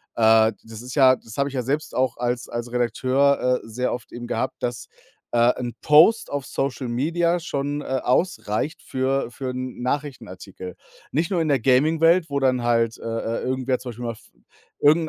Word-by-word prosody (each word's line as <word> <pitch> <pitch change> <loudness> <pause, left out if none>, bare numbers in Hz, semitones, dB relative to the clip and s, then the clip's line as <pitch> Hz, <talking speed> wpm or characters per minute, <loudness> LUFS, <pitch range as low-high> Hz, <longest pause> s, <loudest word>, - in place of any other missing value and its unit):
äh, 110 -1 +5
das 110 0 -10
ist 125 0 -8
ja 130 -2 +6
das 115 -1 -13
habe 140 - +1
ich 135 - -9
ja 125 - -1
selbst 145 +5 -2
auch 130 -2 0
als 120 0 -2
als 120 0 -4
Redakteur, 130 +2 +2
äh, - - -12
sehr 125 +3 -2
oft 120 - -7
eben 120 0 -7
gehabt, 120 +2 -2
dass, 120 -1 -3 0.4
äh, 120 +1 +4
'n 120 -1 -4
Post 160 +10 +5
auf 145 -2 -3
Social 135 0 -3
Media 170 +8 +1
schon, 145 -2 -3
äh, - - -10 0.2
ausreicht 125 - 0
für 130 -1 -1
für 130 0 -5
'n 130 -1 -6
Nachrichtenartikel. 115 -10 -5 0.4
Nicht 160 +6 0
nur 175 - +1
in 160 - 0
der 140 - +3
Gaming-Welt, 160 +7 +3
wo 140 0 -1
dann 130 -2 +2
halt, 115 -1 +1
äh, - - -12
äh, 115 0 -3
irgendwer 130 0 -1
zum 125 - -7
Beispiel 120 +1 -7
mal 115 - -1
f 110 - -17 0.6
irgend 155 +3 +4
130 Hz, 190 wpm, -23 LUFS, 120-145 Hz, 0.6 s, ja